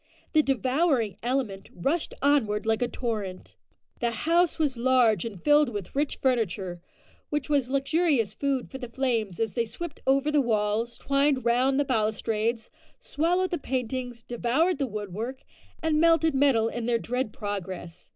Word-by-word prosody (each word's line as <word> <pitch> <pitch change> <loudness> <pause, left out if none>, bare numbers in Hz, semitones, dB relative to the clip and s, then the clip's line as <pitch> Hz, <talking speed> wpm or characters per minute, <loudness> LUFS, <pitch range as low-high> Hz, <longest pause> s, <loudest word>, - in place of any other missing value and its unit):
The 310 - +6
"devouring 265 - +1
element" 240 -6 -2
rushed 295 - -1
onward 230 -8 +2
like 220 +1 +1
a 245 - +2
torrent. 215 -7 -4 0.4
The 240 - +1
house 330 +9 +1
was 295 -5 +1
large 235 -5 +3
and 210 -5 -6
filled 295 - +4
with 205 -2 -6
rich 290 +1 0
furniture, 195 -8 -1 0.5
which 295 -1 -2
was 280 -4 +2
luxurious 275 - +1
food 275 0 -2
for 265 - -7
the 245 -3 -6
flames 230 -8 -1
as 225 -3 -1
they 235 -2 0
swept 305 +8 -7
over 275 +3 +3
the 295 -1 +4
walls, 225 0 0
twined 275 -1 +1
round 255 +3 +3
the 285 - +2
balustrades, 225 -1 -1 0.3
swallowed 360 -3 0
the 345 - -1
paintings, 250 -2 -3
devoured 270 +9 0
the 275 - 0
woodwork, 215 +4 -5 0.4
and 315 -1 +2
melted 330 -1 +4
the - - 0
metal 255 -6 +4
in 235 0 -4
their 240 -1 +3
dread 250 0 -2
progress. 190 -5 -6
250 Hz, 160 wpm, -27 LUFS, 220-285 Hz, 0.5 s, The